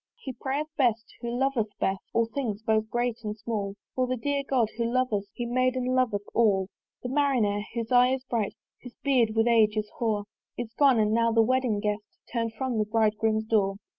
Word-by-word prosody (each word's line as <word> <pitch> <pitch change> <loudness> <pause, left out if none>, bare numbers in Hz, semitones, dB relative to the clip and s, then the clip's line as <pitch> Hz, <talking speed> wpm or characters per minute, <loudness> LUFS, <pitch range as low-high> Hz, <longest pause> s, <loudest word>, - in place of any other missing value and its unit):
He 265 - -7
prayeth 290 +5 -3
best 235 -5 +1
who 235 - -3
loveth 240 -4 -1
best, 190 0 0
All 230 0 +2
things 225 -3 -4
both 220 -1 +1
great 240 -1 -1
and 210 0 -4
small: 210 -2 -3 0.2
For 255 -1 0
the 255 0 -1
dear 285 +4 -1
God, 255 -5 +1
who 235 0 -1
loveth 255 -2 +1
us, - - -37
He 240 - -3
made 255 +1 +1
and 255 0 -1
loveth 235 -6 +1
all. 200 -5 +3 0.3
The 250 - -3
Marinere, 245 -8 +1
whose 230 0 -3
eye 250 0 +6
is 260 - -9
bright, 230 -5 -2 0.3
Whose 245 -1 -11
beard 245 -6 +2
with 225 0 +3
age 220 -2 +4
is 210 0 -2
hoar, 215 -3 0 0.3
Is 235 -2 -5
gone; 275 -2 +4
and 215 -1 +2
now 230 0 +3
the 225 0 +4
wedding 250 -3 +1
guest 210 0 -1 0.3
Turn'd 230 -2 -1
from 255 -3 -1
the 215 - +2
bridegroom's 220 0 +1
door. 205 -3 +2
230 Hz, 205 wpm, -27 LUFS, 215-255 Hz, 0.3 s, eye